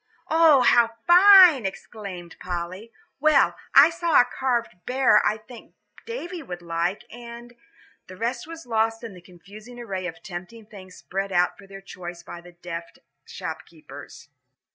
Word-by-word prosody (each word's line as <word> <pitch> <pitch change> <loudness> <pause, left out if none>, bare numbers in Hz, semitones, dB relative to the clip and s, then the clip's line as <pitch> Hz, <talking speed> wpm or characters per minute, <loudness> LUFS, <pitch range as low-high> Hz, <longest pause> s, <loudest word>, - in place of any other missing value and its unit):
"Oh, 320 -4 +5
how 235 -2 +3
fine!" 360 - +7
exclaimed 190 -3 -9
Polly. 180 +5 -6 0.3
"Well, 310 +1 +3 0.2
I 285 +4 +8
saw 335 -2 +2
a 245 - +5
carved 245 -5 -3
bear 250 -4 +3
I 215 - 0
think 220 +2 -15 0.3
Davie 370 -7 -6
would 180 - -9
like, 170 +3 -3
and 240 0 -11 0.3
" - - -31
the 185 - -12
rest 235 +5 -4
was 330 0 -10
lost 225 0 -1
in 225 -3 -8
the 180 - -14
confusing 200 +7 -14
array 190 -6 -5
of 165 -1 -10
tempting 190 +5 -9
things 190 -3 -14
spread 195 +1 -5
out 180 -1 +1
for 200 - -17
their 195 0 -11
choice 175 -3 -10
by 175 - -10
deft 170 -1 -10 0.3
shopkeepers. 155 -3 -10
215 Hz, 150 wpm, -24 LUFS, 180-245 Hz, 0.3 s, I